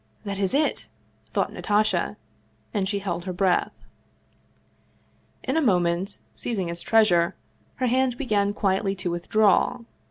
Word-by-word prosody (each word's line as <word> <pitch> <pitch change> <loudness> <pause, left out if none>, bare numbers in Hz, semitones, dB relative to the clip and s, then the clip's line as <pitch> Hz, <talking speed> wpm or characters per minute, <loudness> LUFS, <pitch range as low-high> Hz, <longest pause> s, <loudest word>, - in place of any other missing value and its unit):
" - - -33
That 200 -1 -4
is 195 +4 +2
it! 300 +1 +1 0.2
" - - -38
thought - - -1
Natasha, 215 +1 0 0.6
and 195 -3 0
she 205 - 0
held 175 -3 -3
her 185 - -3
breath. 180 0 0 1.6
In - - -1
a 320 - +3
mo 205 - +4
ment, 175 +3 -1 0.2
seizing 195 -8 -2
its 170 0 -5
treasure, 180 -7 +3 0.4
her 255 - -1
hand 255 0 +1
began 205 -7 +1
quietly 195 -1 0
to 185 -2 -3
with 175 0 -5
draw. 215 +3 +3
200 Hz, 155 wpm, -25 LUFS, 180-220 Hz, 1.6 s, mo